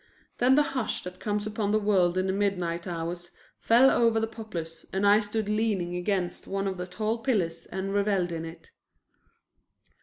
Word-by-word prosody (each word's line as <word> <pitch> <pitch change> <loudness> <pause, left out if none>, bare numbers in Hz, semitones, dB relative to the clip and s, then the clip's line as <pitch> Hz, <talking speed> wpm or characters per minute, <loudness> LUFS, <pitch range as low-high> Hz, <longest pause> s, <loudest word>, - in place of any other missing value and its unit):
Then 255 +2 +5
the 295 - +5
hush 255 -5 -2
that 180 0 -8
comes 210 -1 -2
upon 215 -1 -2
the 215 - +3
world 190 -4 +2
in 185 - +1
the 190 - 0
midnight 180 -4 -1
hours 175 0 -4 0.3
fell 245 +4 +5
over 230 -1 +3
the 225 - +1
Poplars 215 -8 -7
and 190 +1 0
I 205 +1 +6
stood 215 0 -3
leaning 210 -5 0
against 180 -1 -1
one 195 0 -2
of 190 -1 -2
the 180 - -4
tall 215 +5 -2
pillars 175 -9 -1
and 190 +1 -4
reveled 200 -3 +1
in 165 -1 -4
it. 165 0 -10
195 Hz, 180 wpm, -27 LUFS, 175-215 Hz, 0.3 s, I